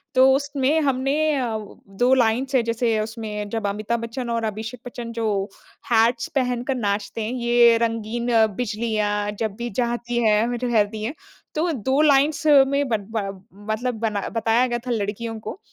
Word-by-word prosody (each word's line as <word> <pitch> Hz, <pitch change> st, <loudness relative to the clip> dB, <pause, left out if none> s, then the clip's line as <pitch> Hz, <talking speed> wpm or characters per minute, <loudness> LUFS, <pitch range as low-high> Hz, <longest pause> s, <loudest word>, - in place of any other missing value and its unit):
तो 260 Hz, +1 st, +6 dB
उसमें 285 Hz, +2 st, +1 dB
हमने 270 Hz, 0 st, +1 dB, 0.2 s
अ, 240 Hz, -4 st, -1 dB
वो 215 Hz, -2 st, -8 dB, 0.2 s
2 250 Hz, +2 st, +4 dB
लाइन्स 255 Hz, +2 st, +2 dB
हैं 250 Hz, -, +4 dB
जैसे 230 Hz, -1 st, 0 dB
उसमें 215 Hz, -2 st, -4 dB
जब 220 Hz, -2 st, -2 dB
अमिताभ 215 Hz, +3 st, -2 dB
बच्चन 235 Hz, +1 st, -5 dB
और 230 Hz, -1 st, -1 dB
अभिषेक 220 Hz, +3 st, -5 dB
बच्चन 235 Hz, -1 st, -7 dB
जो 230 Hz, -1 st, -2 dB, 0.7 s
हैट्स 230 Hz, +1 st, +3 dB
पहनकर 250 Hz, 0 st, 0 dB
नाचते 205 Hz, -1 st, -2 dB
हैं 220 Hz, -, -3 dB
ये 240 Hz, -1 st, +4 dB
रंगीन 230 Hz, +1 st, -2 dB, 0.3 s
बिजलियाँ 210 Hz, -2 st, -1 dB
जब 220 Hz, -3 st, -2 dB
भी 240 Hz, +2 st, -4 dB
जाती 240 Hz, +1 st, -2 dB
है, 225 Hz, +3 st, +2 dB
रहती 215 Hz, -3 st, +1 dB
है, 240 Hz, -, -2 dB, 0.4 s
तो 330 Hz, +2 st, +1 dB
2 265 Hz, +2 st, +1 dB
लाइन्स 295 Hz, +1 st, +3 dB
में 280 Hz, -1 st, +5 dB
बन 215 Hz, -4 st, -1 dB
बा 220 Hz, -2 st, -1 dB, 0.5 s
मतलब 245 Hz, +3 st, -2 dB
बना 215 Hz, -3 st, -1 dB
बताया 225 Hz, +2 st, +3 dB
गया 240 Hz, -, -1 dB
था -, -, -1 dB
लड़कियों 225 Hz, +1 st, -3 dB
को। 220 Hz, -, -7 dB
235 Hz, 165 wpm, -23 LUFS, 220-255 Hz, 0.7 s, तो